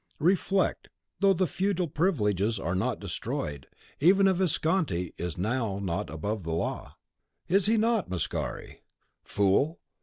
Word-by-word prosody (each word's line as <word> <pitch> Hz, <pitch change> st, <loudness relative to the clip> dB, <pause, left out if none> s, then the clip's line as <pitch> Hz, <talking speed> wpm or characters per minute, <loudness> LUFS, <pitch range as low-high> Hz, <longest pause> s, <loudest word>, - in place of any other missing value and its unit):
Reflect; 190 Hz, +3 st, +1 dB, 0.3 s
though 195 Hz, 0 st, +5 dB
the 185 Hz, -, +2 dB
feudal 185 Hz, +2 st, -1 dB
privileges 110 Hz, -, +1 dB
are 85 Hz, -2 st, -2 dB
not 95 Hz, -, -1 dB
destroyed, 70 Hz, -3 st, -4 dB, 0.3 s
even 195 Hz, +6 st, +5 dB
a 190 Hz, -, +4 dB
Visconti 160 Hz, -, 0 dB
is 85 Hz, -1 st, -4 dB
not 105 Hz, 0 st, -1 dB
now 95 Hz, -1 st, -1 dB
above 100 Hz, +8 st, -3 dB
the 80 Hz, -1 st, -4 dB
law." 85 Hz, -, -3 dB, 0.5 s
"Is 195 Hz, +3 st, +3 dB
he 225 Hz, +1 st, +3 dB
not, 225 Hz, -3 st, +1 dB
Mascari? 90 Hz, -2 st, -4 dB, 0.4 s
Fool! 105 Hz, -, +2 dB
140 Hz, 130 wpm, -28 LUFS, -, 0.5 s, though